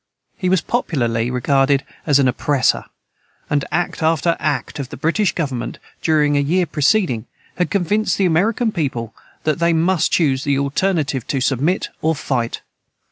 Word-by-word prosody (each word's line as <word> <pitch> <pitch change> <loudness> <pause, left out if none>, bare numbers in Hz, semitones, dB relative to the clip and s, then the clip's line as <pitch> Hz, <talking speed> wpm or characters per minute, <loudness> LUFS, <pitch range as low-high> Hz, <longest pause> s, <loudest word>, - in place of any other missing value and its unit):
He 185 -4 -1
was 185 -2 +3
popularly 120 - -1
regarded 135 +2 +2 0.2
as 145 -3 +5
an 140 -2 +3
oppressor; 135 +2 +1 0.7
and 145 -1 +2
act 175 0 -1
after 165 +1 +2
act 140 0 -2
of 135 -2 -4
the 145 - -8
British 170 - +1
government, 130 -8 -3 0.2
during 150 -2 +2
a - - +3
year 175 +6 +2
preceding, 150 - +1 0.3
had 180 - 0
convinced 205 +3 +1
the 195 - +2
American 215 +7 +2
people 130 - -3 0.3
that 155 +1 0
they 170 0 +3
must 165 +1 +2
choose 135 -6 +2
the 140 -1 +1
alternative 140 - 0
to 135 - -1
submit 140 +7 0
or 160 +1 +1
fight. 130 -4 -2
150 Hz, 155 wpm, -19 LUFS, 135-175 Hz, 0.7 s, as